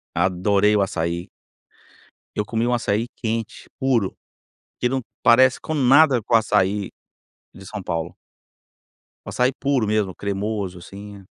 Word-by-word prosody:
Adorei 100 +3 +2
o 100 - +3
açaí. 85 -1 -2 1.1
Eu 105 - 0
comi 115 +2 -1
um 125 - +1
açaí 115 -1 0
quente, 115 -1 -4
puro, 120 -7 0 0.6
que 125 - +2
não 130 0 -1 0.2
parece 130 +2 +5
com 155 - -4
nada 135 -2 +5
com 115 - -1
o - - +9
açaí 100 -2 0 0.6
de 95 - -13
São 105 -1 -7
Paulo. 85 0 -3 1.1
O - - -9
açaí 125 +2 +1
puro 135 -4 0
mesmo, 105 -3 0
cremoso 100 -2 -3
assim. 100 +1 -11
105 Hz, 135 wpm, -22 LUFS, 95-120 Hz, 1.1 s, o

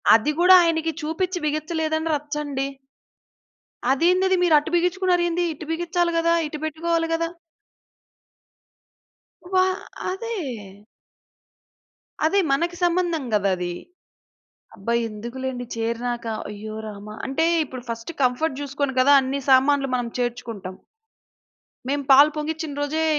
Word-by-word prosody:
అది 225 +7 +2
కూడా 365 +1 +8
ఆయనకి 325 -1 +1
చూపించి 355 +4 -2
బిగించలేదని 315 +1 -1
రచ్చండి! 290 -2 -3 1.2
అదేందది 365 +6 +3
మీరటు 310 -3 +4
బిగించుకున్నారేంది. 355 -1 +1
ఇటు 310 +1 -9
బిగించాలి 345 +1 0
కదా. 335 0 +2
ఇటు 305 - -6
పెట్టుకోవాలి 330 +2 -1
కదా? 330 0 0 2.2
వా 370 0 +5 0.5
అదే. 460 +4 -4 1.9
అది 390 +6 +3
మనకి 340 +5 +1
సంబంధం 345 -3 +1
కదా 200 -2 +2
అది. 180 -1 -3 1.0
అబ్బా! 215 +4 -3 0.2
ఎందుకులెండి 245 +4 -5
చేరినాక! 235 +1 -2 0.2
అయ్యో 215 +1 -7
రామా! 210 0 -9
అంటే, 275 +5 0 0.2
ఇప్పుడు 255 -3 -9
ఫస్ట్ 230 +6 -5
కంఫర్ట్ 265 +3 0
చూసుకొని 285 -1 -2
కదా 275 +3 +6
అన్ని 265 +1 -2
సామాన్లు 270 +1 +4
మనం 245 -1 -1
చేర్చుకుంటాం. 230 -6 -4 1.1
మేము 285 0 0
పాలు 285 +3 +8
పొంగించిన 310 0 -3
రోజే 310 +3 0
300 Hz, 105 wpm, -23 LUFS, 250-335 Hz, 2.2 s, కూడా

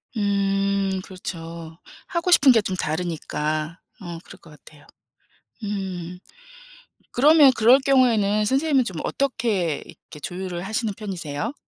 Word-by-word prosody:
음 195 -1 0
그렇죠. 165 -3 -8 0.3
하고 350 0 -1
싶은 275 -6 +7
게 225 - +4
좀 190 -2 -3
다르니까 155 -1 -3 0.2
어 170 -2 -7
그럴 - - -14
것 165 - -17
같아요. 150 0 -17 0.8
음. 185 -3 -5 0.9
그러면 295 +1 +6
그럴 245 +5 +6
경우에는 230 -6 +3
선생님은 270 +2 +2
좀 180 -6 -6
어떻게 215 - -1
이렇게 150 - -14
조율을 180 +1 -5
하시는 220 +1 -2
편이세요? 190 - -4
195 Hz, 265 characters per minute, -23 LUFS, 170-230 Hz, 0.9 s, 싶은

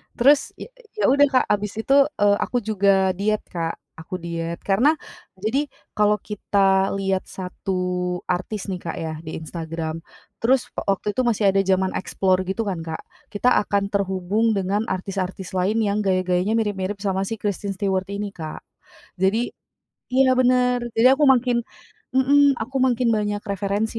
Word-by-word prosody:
Terus, 275 +4 +4
ya - - -9 0.3
ya, 425 - 0
udah 285 +1 +6
Kak, 260 -2 +2
habis 205 0 0
itu, 270 - +1 0.3
eee, 205 0 +5
aku 250 - -2
juga 195 -2 +3
diet 210 +2 0
Kak. 165 -2 -3 0.2
Aku 170 +3 -7
diet, 170 0 -4
karena 230 +10 +3 0.5
jadi, 255 +8 0 0.3
kalau 210 0 +3
kita 195 -2 +1
lihat 195 -1 -1
1 180 -1 -3
artis 190 +3 -2
nih, 185 - -2
Kak, 165 - -3
ya, 160 -1 -4
di 155 - -6
Instagram. 160 0 -5 0.4
Terus 250 +2 +1
wa - - -3
waktu 210 +2 -3
itu - - +4
masih 215 -4 +3
ada 195 0 +3
zaman 190 0 +2
Explore 185 -1 0
gitu 190 +4 -2
kan, 180 -3 -3
Kak, 160 - -5 0.3
kita 210 +4 +2 0.2
akan 200 0 0
terhubung 200 +3 0
dengan 200 +2 0
artis-artis 190 -1 -4
lain 205 +5 +1
yang 205 -1 +1
gaya-gayanya 185 +1 +1
mirip-mirip 205 -3 -1
sama 195 -1 0
si 225 +2 -5
Kristen 200 -1 -2
Stewart 190 -1 -1
ini, 205 0 -3
Kak. 160 -5 -7 0.6
Jadi 220 +6 +2 0.7
iya, 260 0 +5
bener. 250 -1 +3
Jadi 230 +3 +6
aku 295 +2 +2
makin 245 -2 +3 0.5
mhm, 280 +1 +5
aku 255 +5 -6
makin 250 -2 +2
banyak 205 -1 -1
referensi, 200 +2 -2
200 Hz, 160 wpm, -23 LUFS, 185-225 Hz, 0.7 s, udah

